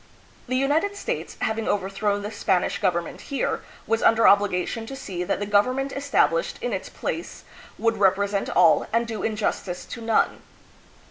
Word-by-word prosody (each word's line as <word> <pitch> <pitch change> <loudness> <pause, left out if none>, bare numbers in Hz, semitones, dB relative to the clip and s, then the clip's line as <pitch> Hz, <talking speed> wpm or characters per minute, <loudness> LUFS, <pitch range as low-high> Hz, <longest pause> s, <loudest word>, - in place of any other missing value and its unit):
The 255 - -1
United 300 +10 +1
States, - - -4
having 220 -1 -1
over 195 -2 0
thrown 205 +1 -1
the 210 - -4
Spanish 195 -3 0
government 175 -4 -1
here, 280 - -2 0.2
was 225 0 0
under 225 0 +4
obliga 200 -3 +4
tion 225 -1 -5
to 270 - -6
see 185 -9 -5
that 180 - -1
the 205 - -2
government 255 +7 +2
established 285 - +1
in - - -3
its - - -4
place - - -5 0.3
would 230 -1 +1
represent 200 0 +2
all 175 -2 +4
and 230 +1 +2
do 220 -2 -5
injustice 205 -4 -2
to 235 - -8
none. 225 -1 +1
220 Hz, 170 wpm, -24 LUFS, 200-255 Hz, 0.3 s, under